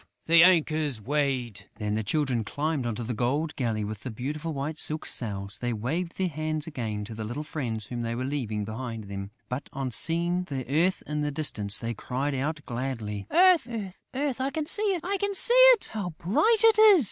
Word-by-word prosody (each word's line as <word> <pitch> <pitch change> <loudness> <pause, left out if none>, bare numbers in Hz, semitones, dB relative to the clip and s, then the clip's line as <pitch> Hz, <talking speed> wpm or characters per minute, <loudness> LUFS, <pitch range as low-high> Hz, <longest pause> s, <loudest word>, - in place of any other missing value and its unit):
The 165 0 +7
anchor's 155 -7 +3
weighed...." 130 -3 -2
Then 105 -1 -3
the 110 +1 -1
Children 130 0 0
climbed 145 +2 -2
into 120 +1 -3
the 120 +2 -3
gold 140 +8 -1
galley, 115 -5 -1
with 105 0 -5
the 130 - -7
beautiful 150 +8 -4
white 150 +2 -4
silk 155 +1 +4
sails. 100 -4 -3
They 120 -1 -2
waved 160 +11 -3
their 190 - 0
hands 155 -1 -3
again 110 -9 -4
to 110 - -8
the 110 0 -6
little 120 +8 -5
friends 120 -8 -3
whom 120 +2 -5
they 115 0 -3
were 130 +2 -3
leaving 115 -7 -3
behind 115 +1 -6
them; 100 -1 -7 0.2
but, 125 +3 -5
on 135 -3 -4
seeing 170 +6 +2
the 135 -6 -5
earth 165 +7 +1
in 150 0 -3
the 150 - -1
distance, 110 -9 -1
they 115 0 -3
cried 135 +6 -3
out, 150 +3 -2
gladly: 115 -5 -4
"Earth! 360 -7 +5 0.5
Earth!... 270 -2 -2
I 265 - 0
can 310 +1 -3
see 375 +6 +6 0.2
it!..." 405 +7 +5
"How 205 -5 -3
bright 435 - +2
it 450 -1 +6
is!..." 425 -4 +8
140 Hz, 190 wpm, -27 LUFS, 115-165 Hz, 0.5 s, is